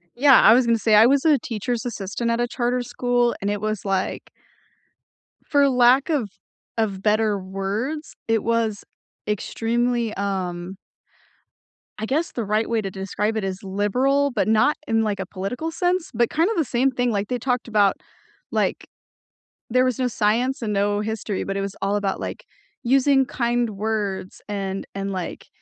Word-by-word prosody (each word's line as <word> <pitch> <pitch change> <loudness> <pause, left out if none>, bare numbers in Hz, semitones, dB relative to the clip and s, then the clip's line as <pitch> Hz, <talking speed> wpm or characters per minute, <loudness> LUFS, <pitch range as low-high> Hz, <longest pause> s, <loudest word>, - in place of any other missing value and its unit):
Yeah, 275 +1 +6
I 220 - +8
was 250 +1 +4
gonna 230 -1 +3
say 220 0 +3
I 215 +2 +8
was 275 +4 +3
a 305 -3 +5
teacher's 230 +2 -3
assistant 230 0 -3
at 230 - 0
a 240 - +1
charter 245 +1 -1
school 245 0 0
and 200 - -1
it 205 -1 -2
was 215 -2 -3
like 195 -1 -2 1.2
for 285 -1 +4
lack 255 +3 +4
of 275 -10 0 0.5
of 205 -4 -1
better 215 0 +2
words, 200 +11 -4
it 225 -1 +1
was 230 -2 0 0.4
extremely 230 +2 -1
um 185 -2 -3 1.2
I 220 - -2
guess 300 +8 -1
the 235 - -3
right 215 +3 0
way 230 -1 +1
to 195 -2 -5
describe 205 +3 -2
it 215 - -2
is 190 0 -4
liberal, 250 +9 +1
but 215 -5 0
not 220 +7 +3
in 225 -1 +2
like 205 -3 -1
a 190 - -3
political 205 - -4
sense, 355 +1 -1
but 235 +1 +2
kinda 335 +7 +1
the 325 - +2
same 255 +3 +1
thing 245 -1 0
like 200 -1 -1
they 250 +2 -2
talked 250 0 -1
about 205 -3 +3 0.6
like, - - -1 0.8
there 255 +2 +4
was 255 -3 -1
no 255 - +1
science 240 +4 0
and 215 -2 -1
no 205 +1 +1
history, 210 -2 -3
but 195 0 -3
it - - -1
was 195 0 -4
all 200 +1 +1
about 200 -2 -1
like - - -6 0.4
using 270 +2 +4
kind 240 -1 0
words 205 -2 -3
and 195 -1 -3
and 195 0 -3
like 185 -2 -5
225 Hz, 175 wpm, -23 LUFS, 200-250 Hz, 1.2 s, I